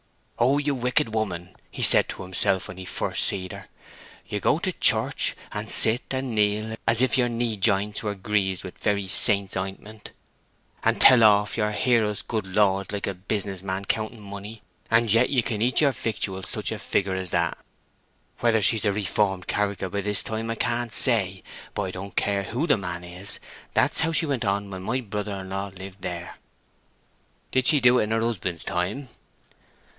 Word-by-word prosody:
'Oh, 130 +4 +3
you 145 0 0
wicked 125 -3 0
woman!' 90 -5 -3
he - - -5
said - - +7
to - - -6
himself 95 +1 -1
when 90 - -9
he 95 - -8
first - - -1
see 95 -2 -1
her, - - -10 0.6
'you - - -4
go - - +2
to - - -2
your - - -20
church, - - +2 0.2
and - - -5
sit, 115 +2 +3
and 130 -2 -3
kneel, 105 +1 0
as 115 +2 +4
if 130 0 +2
your 120 -1 +2
knee 115 -1 -1
jints 100 0 0
were 105 -2 -3
greased 95 -2 -1
with 90 - -10
very 100 -2 0
saint's 100 0 +4
anointment, 100 +3 -6 0.7
and - - +1
tell 125 -3 +8
off 105 -1 +4
your 105 -1 +1
Hear 115 +1 +2
us 105 -1 -4
good 110 -4 -3
Lords 100 0 +1
like 100 -1 -3
a 100 - -2
business 95 0 -4
man 95 +1 -4
counting 110 +2 -2
money; 100 +2 -9 0.3
and 115 -2 +3
yet 115 +2 +4
you 130 -4 +2
can 110 -2 -3
eat 125 +5 +2
your 145 -2 +4
victuals 100 -6 -4
such - - -3
a - - -4
figure 95 -1 -1
as 95 -1 -3
that!' 85 -1 -1 0.8
Whether 115 -3 +2
she's 110 +1 +4
a 105 - +3
reformed 95 -1 0
character 100 -2 -1
by 100 +3 -3
this 105 0 +3
time 110 +1 -4
I 115 - -1
can't 120 +1 -2
say; 100 -7 +2 0.3
but - - -1
I 95 - -4
don't 95 +2 -8
care 100 -1 +1
who 125 - -2
the 150 - +3
man 90 -3 -5
is, 90 +3 -2 0.4
that's - - +3
how 165 - +1
she 160 - +1
went 135 -6 -2
on 100 0 -1
when 95 -1 -6
my 115 +7 -1
brother 105 -3 -5
in 95 0 -10
law 100 +1 -3
lived 95 0 -11
there." 90 -2 -6 1.1
"Did 130 -1 +2
she 150 - +6
do 125 -1 +5
it - - +1
in - - -7
her 115 0 +1
husband's 95 -8 -2
time?" 95 +12 -3
105 Hz, 195 wpm, -25 LUFS, 95-115 Hz, 1.1 s, tell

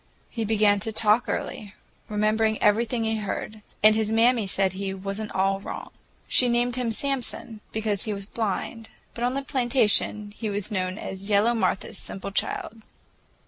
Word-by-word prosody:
He 230 -3 -2
began 210 -1 +3
to 220 - -3
talk 220 +2 +3
early, 205 -1 -4 0.3
remembered 215 +1 +2
everything 225 +3 +2
he 220 0 0
heard, 215 +1 -4 0.2
and 215 0 +8
his 220 0 0
mammy 225 -1 +4
said 190 0 +1
he 190 0 -3
"was 195 +2 -4
n't 215 - -5
all 195 +1 +1
wrong." - - -7 0.4
She 250 - +4
named 240 +1 +1
him 245 -2 -1
Samson, 240 -3 -3
because 215 -2 -1
he 215 - -2
was 200 -1 -4
blind, 220 +1 -3 0.2
but 235 - -5
on 250 +2 +1
the 275 - -1
plantation 235 -5 +2
he 220 -1 -3
was 205 0 -3
known 185 -1 -1
as 195 -1 -6
"yellow 210 +3 +4
Martha's 225 -4 -1
simple 195 +1 -6
child." 220 +2 -2
215 Hz, 170 wpm, -26 LUFS, 200-230 Hz, 0.4 s, and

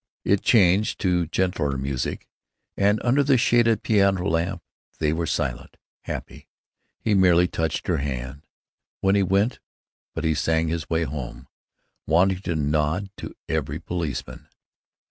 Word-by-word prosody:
It 100 -1 +2
changed 100 -2 +3
to 90 -3 +1
gentler 85 -6 -1
music, 65 -1 -3 0.5
and 100 +2 +2
under 130 +4 +3
the 135 -1 +4
shaded 115 -2 +3
piano 100 -3 +2
lamp 85 +1 -1 0.3
they 75 -1 +1
were 85 0 -2
silent, 65 -5 -3 0.3
happy. - - -7 0.5
He 110 - 0
merely 90 -2 +5
touched 80 -2 -2
her - - +1
hand, 70 +2 -5 0.5
when 95 0 +3
he 100 - +3
went, 100 +5 +1 0.6
but - - -3
he 80 -1 +2
sang 80 +1 +1
his 80 -1 -3
way 80 0 +1
home, 65 -4 -6 0.6
wanting 90 +4 +3
to 85 -4 -3
nod 75 +6 0
to - - -8
every - - -2
policeman. 85 -7 -5
85 Hz, 140 wpm, -24 LUFS, 75-100 Hz, 0.6 s, merely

